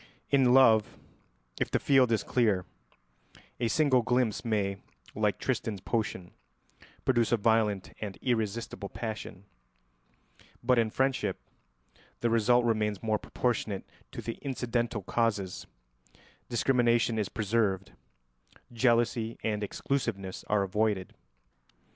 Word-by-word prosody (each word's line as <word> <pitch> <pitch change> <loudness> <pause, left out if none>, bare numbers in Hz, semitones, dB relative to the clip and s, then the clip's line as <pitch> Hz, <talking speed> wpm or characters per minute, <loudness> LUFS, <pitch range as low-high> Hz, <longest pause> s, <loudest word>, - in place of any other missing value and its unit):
In 135 -3 +5
love, 115 -5 +5 0.6
if - - 0
the - - +1
field 130 -4 +4
is 110 - +1
clear, 105 -7 +1 0.9
a 120 - +1
single 130 0 +3
glimpse 125 -2 0
may, 100 -4 0 0.4
like 105 -1 0
Tristan's 110 -5 -2
potion, 95 -3 -3 0.7
produce 120 -4 +2
a 120 - +4
violent 110 -3 +1
and 100 -3 -5
irresistible 110 -3 -2
passion; 105 -4 -6 1.2
but 125 0 +4
in 115 -1 +2
friendship 130 -6 0 0.8
the 120 - +1
result 120 +2 +4
remains 105 -4 0
more 110 -1 +1
proportionate 110 -5 -2 0.3
to - - -7
the 115 - -5
incidental 120 -5 -2
causes, 100 -3 -1 0.8
discrimination 120 -2 +2
is 105 - -1
preserved, 105 -3 0 0.8
jealousy 115 -1 +1
and 105 -1 -1
exclusiveness 105 -5 -3
are 105 -1 +2
avoided. 100 -1 -1
115 Hz, 110 wpm, -29 LUFS, 105-120 Hz, 1.2 s, In